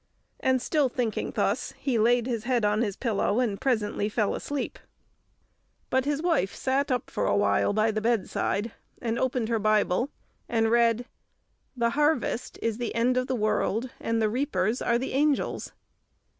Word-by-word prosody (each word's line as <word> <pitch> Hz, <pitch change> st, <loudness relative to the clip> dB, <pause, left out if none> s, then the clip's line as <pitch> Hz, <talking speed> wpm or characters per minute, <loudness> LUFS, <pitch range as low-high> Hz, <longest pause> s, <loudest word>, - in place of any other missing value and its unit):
And 260 Hz, -1 st, +1 dB
still 295 Hz, -5 st, +2 dB
thinking 240 Hz, -3 st, -2 dB
thus, -, -, 0 dB
he 250 Hz, -5 st, 0 dB
laid 240 Hz, +2 st, +3 dB
his 235 Hz, -3 st, -3 dB
head 245 Hz, -3 st, +1 dB
on 210 Hz, +2 st, +2 dB
his 205 Hz, -5 st, -1 dB
pillow, 215 Hz, -2 st, 0 dB
and 225 Hz, -4 st, -1 dB
presently 215 Hz, -5 st, 0 dB
fell 210 Hz, -1 st, 0 dB
asleep. 290 Hz, -2 st, -4 dB, 1.1 s
But 260 Hz, 0 st, +2 dB
his 295 Hz, +2 st, -1 dB
wife 320 Hz, -, +1 dB
sat 270 Hz, +2 st, 0 dB
up 250 Hz, -2 st, -1 dB
for -, -, -1 dB
a -, -, +2 dB
while 205 Hz, -, +2 dB
by 215 Hz, +2 st, +2 dB
the 215 Hz, 0 st, -2 dB
bedside, 225 Hz, -1 st, 0 dB, 0.3 s
and 230 Hz, 0 st, -2 dB
opened 250 Hz, -3 st, 0 dB
her 230 Hz, -1 st, +1 dB
Bible, 215 Hz, +3 st, +2 dB, 0.4 s
and 225 Hz, -1 st, +2 dB
read, 235 Hz, 0 st, +3 dB, 0.7 s
"The 235 Hz, -1 st, +2 dB
harvest 295 Hz, -3 st, 0 dB
is 230 Hz, 0 st, -1 dB
the 240 Hz, -2 st, -3 dB
end 240 Hz, +2 st, +2 dB
of 255 Hz, 0 st, 0 dB
the 260 Hz, -, 0 dB
world, 220 Hz, +2 st, 0 dB
and 230 Hz, 0 st, -1 dB
the 220 Hz, -, +3 dB
reapers 230 Hz, -2 st, 0 dB
are 235 Hz, -, +2 dB
the 260 Hz, +2 st, -4 dB
angels." 290 Hz, +1 st, 0 dB
235 Hz, 170 wpm, -27 LUFS, 215-260 Hz, 1.1 s, laid